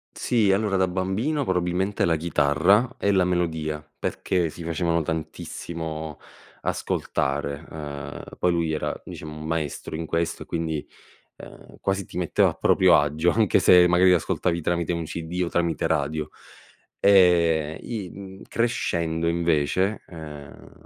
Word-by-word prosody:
Sì, 110 -5 +2
allora 100 0 +1
da 95 0 +3
bambino 95 +11 -1
probabilmente 90 +1 0
la 85 - +2
chitarra, 85 - +2
e 100 - +1
la 95 -2 +4
melodia, 80 -4 -1
perché 90 -3 -1
si 85 - -9
facevano 85 0 0
tantissimo 80 0 -5 0.4
ascoltare, 70 +2 -2
uhm, 75 -2 -7 0.2
poi 90 - +3
lui 85 -2 0
era 80 - -2
diciamo 75 0 -8
un 75 - -7
maestro 80 -2 -3
in 80 +1 -4
questo 85 +1 -1
e - - -20
quindi, 80 -3 -3 0.5
uhm, - - -13
quasi 95 0 -1
ti - - -9
metteva 90 - +3
a - - -5
proprio - - +4
agio, 75 +4 +1
anche 110 -1 +3
se 90 -1 +7
magari 90 +1 +5
ascoltavi 85 0 0
tramite 85 +1 0
un 85 -1 -3
CD 85 +3 -4
o - - -4
tramite 85 -1 0
radio. 75 -1 -1 0.7
E 85 -5 +4
i, 105 -6 -5
mhmm, 95 -1 -10
crescendo 85 -8 -1
invece, 85 +4 +1
uhm, 75 -4 -10
85 Hz, 140 wpm, -25 LUFS, 80-95 Hz, 0.7 s, se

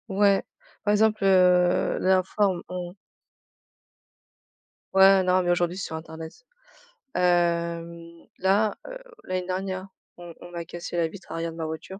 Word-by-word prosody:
Ouais. 200 0 +3 0.4
Par 205 - +1
exemple, 215 0 +2
heu, 180 -2 +4
l'informe 190 0 +1
on 180 0 -6 2.0
Ouais, 190 0 +6
non 185 0 +3
mais 175 -1 +1
aujourd'hui 175 0 0
c'est 195 - -4
sur 160 - -6
internet. 160 - -9 0.7
Hem, 170 -1 +1 0.4
là, 200 +3 +2
heu, - - -7 0.3
l'année 185 -1 -3
dernière 185 0 -3 0.3
on 175 -1 -10
on 175 - -11
m'a 170 -1 -6
cassé 175 +1 -7
la 170 -1 +2
vitre 190 +4 -12
arrière 165 0 -3
de - - -12
ma 165 - -3
voiture. 160 +5 -7
180 Hz, 140 wpm, -25 LUFS, 170-190 Hz, 2.0 s, Ouais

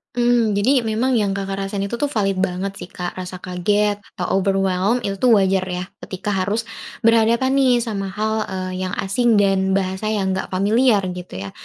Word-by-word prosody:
Mhm, 240 -3 +2
jadi 255 +5 +3
memang 230 +4 0
yang 210 -4 +2
Kakak 195 0 -3
rasain 195 0 -3
itu 200 - -7
tuh 290 - +2
valid 195 -6 0
banget 190 +1 -2
sih, - - -8
Kak. 175 -1 -5
Rasa 185 0 -7
kaget 205 +3 0 0.2
atau 180 - -2 0.2
overwhelmed, 195 +4 +1
itu 200 - -1
tuh 255 - +4
wajar 190 -1 +2
ya, 180 0 -3 0.2
ketika 195 +2 -4
harus 200 +4 0 0.4
berhadapan 230 +3 +4
nih 265 -2 +4
sama 200 -4 -3
hal, 215 +2 -2 0.2
eee, 185 0 -4
yang 185 -1 -3
asing 230 +4 +2
dan 190 -1 +2
bahasa 190 +2 -2
yang 195 -3 0
enggak 190 - -3
familiar, 205 +3 +3
gitu, 180 0 -9
ya. 100 +1 -6
195 Hz, 185 wpm, -20 LUFS, 190-225 Hz, 0.4 s, tuh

